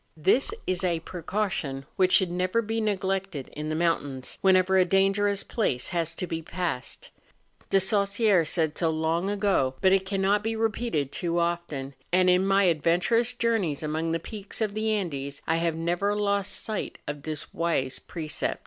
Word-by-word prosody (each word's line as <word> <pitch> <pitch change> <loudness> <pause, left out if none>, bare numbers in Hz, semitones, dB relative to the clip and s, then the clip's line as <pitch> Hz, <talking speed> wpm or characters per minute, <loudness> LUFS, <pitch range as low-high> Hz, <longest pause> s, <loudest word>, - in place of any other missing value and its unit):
This 195 - +3
is 185 0 0
a 170 -2 +1
precaution 170 -6 -3
which 185 -1 +3
should 185 -2 +4
never 185 +6 0
be 225 +1 -2
neglected 195 -7 -2
in 150 +1 -4
the 155 - -1
mountains, 145 -6 -1
whenever 190 0 +4
a 190 - +6
dangerous 195 +2 +2
place 130 - -1
has 170 -2 -2
to 180 - -3
be 165 -2 -4
passed. 165 -5 -4 0.6
I)e 195 - +5
Saussure 200 -1 +3
said 160 -1 0
so 165 - +1
long 160 +4 0
ago, 195 -11 +1
but 190 - +4
it 190 0 +2
cannot 200 +1 +1
be 225 +1 -1
repeated 220 - -1
too 170 -1 -2
often; 170 -5 -2 0.2
and 185 0 +5
in 185 +2 +3
my 195 0 +4
adven¬ 165 0 +3
turous 235 +5 +1
journeys 210 - 0
among 160 +2 -1
the 165 - +1
peaks 205 +3 -7
of 215 -3 0
the 215 +1 -1
Andes 145 -9 -3
I 165 - +1
have 165 -1 0
never 175 +5 0
lost 200 -1 0
sight 215 -2 -4
of 145 0 -4
this 155 0 -5
wise 155 -6 -1
precept. 155 -3 -3
180 Hz, 175 wpm, -27 LUFS, 160-200 Hz, 0.6 s, a